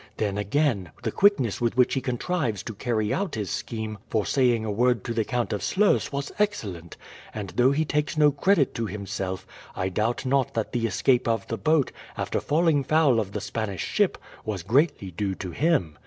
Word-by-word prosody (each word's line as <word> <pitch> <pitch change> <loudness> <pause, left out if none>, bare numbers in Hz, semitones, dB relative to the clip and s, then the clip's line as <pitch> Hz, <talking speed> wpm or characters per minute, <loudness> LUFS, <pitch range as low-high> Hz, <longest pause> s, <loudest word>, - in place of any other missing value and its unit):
Then, 105 -3 -1
again, 105 - 0
the - - -1
quickness 140 - +3
with 120 +1 0
which 125 - +4
he 135 - 0
contrives 125 - -2
to 115 - -6
carry 110 -1 -1
out 190 -7 -2
his 105 -4 -3
scheme 110 -2 -4
for 110 -2 0
saying 120 -4 +2
a 105 - -1
word 120 +1 +2
to 115 - -3
the 115 -1 +1
Count 120 +1 -1
of 105 - -2
Sluys 205 +2 +2
was 140 0 -3
excellent; 100 - -2 0.4
and 105 -3 -5
though 125 +1 +4
he 155 +3 +1
takes 150 +1 -1
no 150 -1 +6
credit 145 +1 +2
to 115 -3 -2
himself, 95 -1 -4 0.3
I 95 +1 -1
doubt 110 +7 -1
not 130 0 +1
that 110 -2 -1
the 115 -2 0
escape 125 +2 +2
of 115 -1 0
the 115 - -2
boat, 155 +4 +2 0.3
after - - -1
falling 155 -2 +2
foul 145 -4 +3
of 100 -2 -3
the - - -3
Spanish 105 -6 -3
ship, - - +1 0.3
was 100 -5 -4
greatly 120 - +1
due 95 +2 -2
to 95 -2 -6
him. 95 - +1
115 Hz, 200 wpm, -26 LUFS, 105-140 Hz, 0.4 s, no